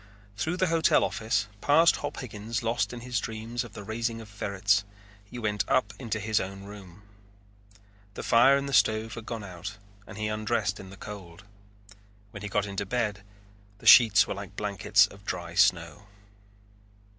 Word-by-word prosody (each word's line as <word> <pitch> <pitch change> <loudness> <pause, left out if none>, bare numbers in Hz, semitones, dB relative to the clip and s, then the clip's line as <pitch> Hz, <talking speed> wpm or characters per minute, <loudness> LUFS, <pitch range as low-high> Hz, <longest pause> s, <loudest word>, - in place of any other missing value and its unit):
Through 160 - -2
the 185 - +2
hotel 165 -1 +4
office, 115 0 0 0.2
past 160 +6 +5
Hop 145 -1 -5
Higgins 110 -1 -5
lost 115 -3 0
in 120 -1 -8
his 125 0 -2
dream 110 +1 -6
of 115 -5 -12
the 105 - -8
raising 115 +2 -3
of 110 -2 -11
ferrets, 100 0 0 0.4
he 100 - -10
went 105 -3 -1
and - - +4
up 130 - -2
into 115 -4 -3
his 110 0 +1
own 95 +1 -6
room. 100 -2 -12 1.1
The - - -6
fire 135 +4 +5
in 140 - -3
the 140 - -5
stove 110 -2 +2
had 115 -1 -9
gone 115 -3 -5
out 95 0 -8 0.3
and 110 - -10
he 110 - -3
undressed 110 -2 -1
in 95 - -10
the 100 - -12
cold. 95 -4 -10 0.9
When 100 -3 -9
he 105 - -5
got 105 -1 0
into 100 0 -3
bed 105 -1 -2 0.6
the - - -17
sheets 110 -5 +8
were - - -4
like 100 0 -9
blankets 100 -2 +3
of 100 0 -14
dry 85 -3 -5
snow. 85 +4 +2
105 Hz, 180 wpm, -28 LUFS, 100-115 Hz, 1.1 s, sheets